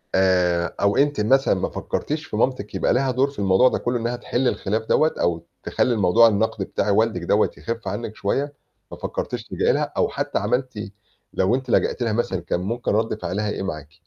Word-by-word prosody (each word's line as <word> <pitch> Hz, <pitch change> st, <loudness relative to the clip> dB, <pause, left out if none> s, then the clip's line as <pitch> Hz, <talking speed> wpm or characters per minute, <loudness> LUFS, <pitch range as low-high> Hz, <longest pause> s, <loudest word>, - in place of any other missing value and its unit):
آآ 90 Hz, -2 st, +2 dB
أو 100 Hz, 0 st, +2 dB
أنتِ 145 Hz, -5 st, +2 dB
مثلًا 135 Hz, +4 st, +3 dB
ما 95 Hz, -, -1 dB
فكّرتيش 150 Hz, +1 st, -3 dB
في 105 Hz, -, -6 dB
مامتِك 120 Hz, -4 st, -1 dB
يبقى -, -, +2 dB
ليها 130 Hz, +1 st, +1 dB
دور 135 Hz, +3 st, +2 dB
في 140 Hz, -, -11 dB
الموضوع 100 Hz, +6 st, +4 dB
ده -, -, -1 dB
كلّه 120 Hz, 0 st, -1 dB
إنّها 120 Hz, +2 st, -2 dB
تحِل 125 Hz, +1 st, -1 dB
الخلاف 110 Hz, +1 st, -1 dB
دَوّة 155 Hz, +7 st, +3 dB
أو 85 Hz, -1 st, 0 dB, 0.2 s
تخلّي 125 Hz, -, +1 dB
الموضوع 110 Hz, +3 st, +5 dB
النَقد 110 Hz, -1 st, 0 dB
بتاع 105 Hz, -, -2 dB
والدِك 110 Hz, -3 st, +2 dB
دَوّة 105 Hz, +5 st, +3 dB
يخف 115 Hz, -3 st, -5 dB
عنِّك 105 Hz, +2 st, -4 dB
شوية؟ 140 Hz, +8 st, -1 dB, 0.4 s
ما -, -, -8 dB
فكّرتيش -, -, -4 dB
تلجئي -, -, +1 dB
لها -, -, -1 dB
أو -, -, +2 dB
حتى -, -, -2 dB
عملتِ 115 Hz, -1 st, -2 dB, 0.4 s
لو 95 Hz, +6 st, +2 dB
أنتِ 130 Hz, -1 st, -5 dB
لجأتي 120 Hz, -, +1 dB
لها 110 Hz, -, 0 dB
مثلًا 105 Hz, -5 st, -1 dB
كان 85 Hz, 0 st, -2 dB
ممكن 115 Hz, +6 st, -2 dB
رَد 110 Hz, 0 st, 0 dB
فعلها 100 Hz, +4 st, -2 dB
إيه 95 Hz, -, -3 dB
معاكِ؟ 75 Hz, -5 st, -6 dB
110 Hz, 200 wpm, -23 LUFS, 95-125 Hz, 0.4 s, الموضوع